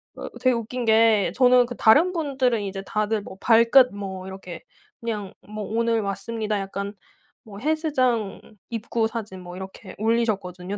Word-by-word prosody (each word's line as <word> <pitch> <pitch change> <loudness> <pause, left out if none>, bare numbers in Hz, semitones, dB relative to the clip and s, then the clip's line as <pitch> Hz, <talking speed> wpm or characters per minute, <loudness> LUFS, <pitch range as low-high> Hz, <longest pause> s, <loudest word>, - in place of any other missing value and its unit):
어 - - -7
되게 255 -1 +3
웃긴 235 +1 -3
게 220 -2 +4
저는 250 -1 +5
그 245 0 -7
다른 310 +12 +5
분들은 265 -8 0
이제 195 -1 -5
다들 215 0 -1
뭐 190 - -11
발끝 235 +3 +6
뭐 190 -2 -6
이렇게 190 - -9 0.4
그냥 210 -4 -4
뭐 215 0 -6
"오늘 230 0 0
왔습니다." 210 +1 -3
약간 200 +1 -5 0.5
뭐 205 -2 -11
헬스장 260 -8 0 0.3
입구 225 0 -1
사진 210 -5 -6
뭐 175 0 -9
이렇게 190 +1 -9
올리셨거든요 205 -4 -1
220 Hz, 300 characters per minute, -24 LUFS, 200-235 Hz, 0.5 s, 발끝